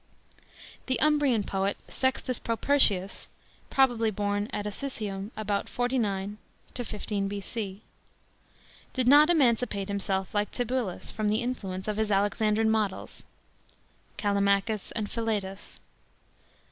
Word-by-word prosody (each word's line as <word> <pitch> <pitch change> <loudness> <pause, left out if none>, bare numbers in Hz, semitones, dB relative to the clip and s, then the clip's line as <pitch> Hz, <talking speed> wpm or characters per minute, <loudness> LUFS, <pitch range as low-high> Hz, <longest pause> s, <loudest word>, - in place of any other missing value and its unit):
The 260 - +1
Umbrian 290 -7 +3
poet 195 +1 -1
SEXTUS 260 -1 -1
PROPERTIUS 225 -5 +2 0.4
(probably 245 -4 +3
born 205 0 -1
at 205 - -3
Asisium, 210 -3 -4
about 205 -2 -1
49 210 -5 -1 0.3
15 210 -4 -3
B.C.) 200 0 -5 1.1
did 255 -2 0
not 295 +4 +8
emancipate 235 - +2
himself 195 -1 -2
like 205 0 +1
Tibullus 245 -6 -2
from 215 -1 -1
the 215 +3 +1
influence 195 -7 -4
of 210 -1 -1
his 220 -1 0
Alexandrine 210 +2 +2
models, 210 -3 -1 1.0
Callimachus 200 +1 +1
and 215 -3 -2
Philetas. 205 -4 -3
210 Hz, 105 wpm, -28 LUFS, 200-245 Hz, 1.1 s, not